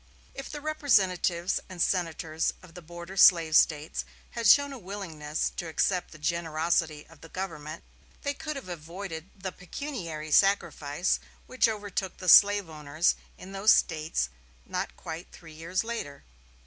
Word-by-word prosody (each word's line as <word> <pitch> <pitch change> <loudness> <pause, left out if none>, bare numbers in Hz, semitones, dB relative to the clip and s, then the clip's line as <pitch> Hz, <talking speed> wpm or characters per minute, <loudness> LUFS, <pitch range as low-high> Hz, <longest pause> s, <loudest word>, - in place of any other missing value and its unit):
If 275 - -7
the 295 - -7
representatives 190 - +1
and 185 -1 -9
senators 165 -3 0
of 175 -2 -15
the 180 - -10
border 170 +3 -9
slave 165 -5 +6
States 155 0 +3 0.3
had 230 -2 -1
shown 285 +5 +6
a 265 - -8
willingness 165 -7 -4
to 175 - -3
accept 180 +3 0
the 155 - -13
generosity 160 -1 0
of - - -19
the 165 - -12
government, 160 -4 -6 0.4
they 285 - -1
could 305 0 -5
have 275 -8 -7
avoided 170 +1 -7
the 190 -1 -5
pecuniary 170 - -6
sacrifice 175 -4 +2 0.3
which 255 -2 +2
overtook 205 -3 -4
the 185 - -2
slave 205 0 +7
owners 155 +1 0 0.2
in 190 - -11
those 195 +2 +5
States 155 - 0 0.4
not - - -4
quite 165 +3 -7
three 165 -2 -13
years 165 +5 -2
later. 225 -12 -5
175 Hz, 150 wpm, -28 LUFS, 160-200 Hz, 0.4 s, slave